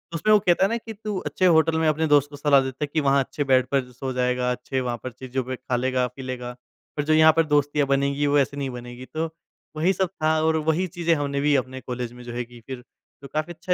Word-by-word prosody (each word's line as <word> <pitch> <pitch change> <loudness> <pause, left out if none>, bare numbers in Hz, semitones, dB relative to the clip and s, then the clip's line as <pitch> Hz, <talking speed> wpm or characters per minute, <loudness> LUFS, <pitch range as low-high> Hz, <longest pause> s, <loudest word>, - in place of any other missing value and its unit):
उसमें 215 +6 +1
वो 210 - +7
कहता 175 -1 +2
है - - 0
ना 230 - 0
कि, 225 -1 -8
तू 210 -1 -5
अच्छे 185 - -1
होटल 160 -1 +4
में 160 - +2
अपने 155 +1 +1
दोस्त 145 -1 +4
को 145 - -10
सलाह 145 -1 +4
देता 130 +2 -4
है 150 - 0
कि 160 - +2
वहाँ 140 0 +3
अच्छे 145 - -4
बेड 130 -2 +3
पर 130 -2 0
सो 130 +2 -5
जाएगा 125 0 0
अच्छे 125 +1 -3
वहाँ 120 -1 -2
पर 130 - -5
चीज़ 130 +2 -5
पे 130 +1 -5
खा 130 0 -3
लेगा 125 0 +1
पी 135 - -8
लेगा। 125 -1 -5 0.5
पर 145 - +1
जो 155 - +2
यहाँ 155 0 +7
पर 165 - +4
दोस्तियाँ 145 -1 +1
बनेगी 140 +1 +1
वो 145 0 +4
ऐसे 140 +1 0
नहीं 140 -1 -2
बनेगी 125 0 -8
तो 160 +1 -2 0.5
वही 180 +5 +2
सब 190 0 0
था 155 0 +3
और 160 0 +2
वही 180 +4 +1
चीज़ें 170 -1 0
हमने 140 -1 -2
भी 145 0 +3
अपने 130 0 -2
कॉलेज 125 -1 -5
में 125 0 -12
जो 120 0 -7
है 120 0 -2
कीं। 120 0 -15
फ़िर 125 +1 -8 0.4
तो 140 - -9
काफ़ी 155 +5 -3
अच्छा 180 +2 -2
140 Hz, 265 wpm, -24 LUFS, 130-160 Hz, 0.5 s, वो